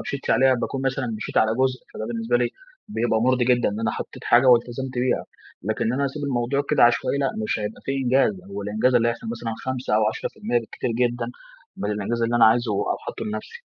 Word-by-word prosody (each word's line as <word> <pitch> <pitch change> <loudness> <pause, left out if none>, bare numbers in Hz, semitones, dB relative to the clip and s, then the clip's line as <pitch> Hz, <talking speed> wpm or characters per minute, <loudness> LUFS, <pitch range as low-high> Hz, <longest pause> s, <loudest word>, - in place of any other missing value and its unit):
مشيتش 140 - -4
عليها 130 0 +5
باكون 130 +2 -3
مثلًا 135 -1 -1
مشيت 105 - -6
على 110 0 +3
جزء، 130 0 +1
فده 110 - -4
بالنسبة 115 +1 0
لي 120 0 +1 0.4
بيبقى 120 - 0
مُرضي 125 +1 +3
جدًا، 125 0 +3
إن 105 +2 -4
أنا 115 - +1
حطيت - - -7
حاجة 120 +2 +5
والتزمت 125 +1 +3
بيها. 125 0 +1 0.4
لكن 110 +2 -1
إن 115 - +1
أنا 140 +2 0
أسيب 140 +2 -4
الموضوع 135 +1 0
كده - - +4
عشوائي، 120 +4 +2
لأ، 135 -1 +1
مش 105 - -1
هيبقى 105 +1 -5
في 135 - -1
إنجاز، 135 - +2 0.2
هو 100 - -5
الإنجاز 110 +5 +1
اللي 120 -1 +4
هيحصل 115 0 -4
مثلًا 115 -1 -4
5 130 -4 -1
أو 110 0 +3
10% 115 +2 -2
بالكتير 115 +1 -4
جدًا، 120 0 0 0.5
من 100 +2 -2
الإنجاز 105 +3 -2
اللي 115 +1 +1
أنا - - +6
عايزه 115 0 +3
أو 100 - -1
حاطه - - -5
لنفسي. 110 0 -6
120 Hz, 215 wpm, -24 LUFS, 110-130 Hz, 0.5 s, أنا